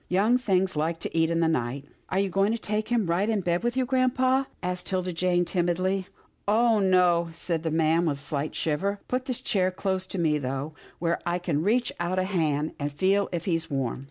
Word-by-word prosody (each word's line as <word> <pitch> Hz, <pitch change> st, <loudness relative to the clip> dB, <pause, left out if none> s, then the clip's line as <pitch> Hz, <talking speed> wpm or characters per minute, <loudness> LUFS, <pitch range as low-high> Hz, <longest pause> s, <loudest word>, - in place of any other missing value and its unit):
Young 210 Hz, +7 st, +3 dB
things 190 Hz, -6 st, +1 dB
like 160 Hz, +2 st, 0 dB
to -, -, -5 dB
eat 165 Hz, 0 st, +3 dB
in 165 Hz, 0 st, +1 dB
the 165 Hz, -, +3 dB
night." 135 Hz, -2 st, -1 dB
" -, -, -38 dB
Are 185 Hz, -, -1 dB
you 200 Hz, 0 st, +2 dB
going 195 Hz, +3 st, +2 dB
to -, -, -1 dB
take 215 Hz, 0 st, -2 dB
him 235 Hz, -4 st, +2 dB
right 175 Hz, +5 st, +1 dB
in 215 Hz, -3 st, +1 dB
bed 175 Hz, -1 st, 0 dB
with 240 Hz, +1 st, -1 dB
you, 260 Hz, -, +2 dB
grampa?" 260 Hz, +1 st, +2 dB, 0.2 s
asked 180 Hz, 0 st, -3 dB
'Tilda 185 Hz, -1 st, -1 dB
Jane 175 Hz, +1 st, +1 dB
timidly. 185 Hz, +2 st, 0 dB, 0.2 s
" -, -, -41 dB
Oh! 225 Hz, +1 st, +4 dB
no," 180 Hz, -3 st, +3 dB
said 165 Hz, 0 st, -2 dB
the 165 Hz, -, -1 dB
old 155 Hz, -, -2 dB
man 165 Hz, +1 st, +3 dB
with 145 Hz, -3 st, 0 dB
a -, -, -8 dB
slight 145 Hz, +1 st, -3 dB
shiver. 195 Hz, +6 st, -1 dB
" -, -, -41 dB
Put 255 Hz, +1 st, -2 dB
his 255 Hz, -3 st, -2 dB
chair 185 Hz, -2 st, +1 dB
close 185 Hz, 0 st, -2 dB
to 190 Hz, -, -6 dB
me, 155 Hz, -3 st, +2 dB
though, 135 Hz, +3 st, -3 dB, 0.2 s
where 170 Hz, 0 st, 0 dB
I 175 Hz, 0 st, 0 dB
can 170 Hz, -4 st, -1 dB
reach 235 Hz, +7 st, +1 dB
out 175 Hz, +2 st, -1 dB
a 185 Hz, -, +2 dB
hand, 160 Hz, -6 st, 0 dB
and 145 Hz, 0 st, -2 dB
feel 195 Hz, +7 st, +1 dB
if 175 Hz, -2 st, -3 dB
he's 165 Hz, -3 st, -1 dB
warm." 135 Hz, -5 st, -2 dB
180 Hz, 240 wpm, -26 LUFS, 165-200 Hz, 0.2 s, Oh